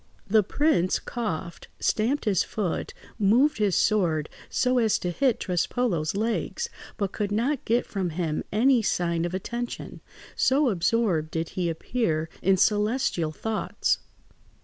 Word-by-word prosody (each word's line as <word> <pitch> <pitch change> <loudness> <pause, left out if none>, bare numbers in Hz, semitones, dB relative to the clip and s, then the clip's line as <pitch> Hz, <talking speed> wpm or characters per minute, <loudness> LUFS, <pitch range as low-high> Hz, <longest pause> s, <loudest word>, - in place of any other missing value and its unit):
The 215 +2 +5
prince 205 - +2
coughed, 175 -7 -5
stamped 250 +7 +1
his 200 -5 +3
foot, 200 -6 -3 0.2
moved 235 +8 +4
his 205 -4 +2
sword 165 -8 +2 0.2
so 250 0 +2
as 220 -3 +3
to 180 - -3
hit 255 +5 +1
Trespolo's 180 -2 0
legs, 230 - -1 0.3
but 200 -3 -1
could 205 -2 -2
not 245 +6 0
get 235 +2 +2
from 190 -3 -2
him 160 -2 -2
any 245 +4 +4
sign 170 -4 0
of 175 +1 -3
attention, 235 +5 -5 0.3
so 275 +1 +3
absorbed 180 -3 +1
did 160 0 -3
he 180 -2 -1
appear 160 -2 -1
in 190 +1 +3
celestial 210 -5 +1
thoughts. 220 +7 -1
205 Hz, 135 wpm, -26 LUFS, 175-235 Hz, 0.3 s, The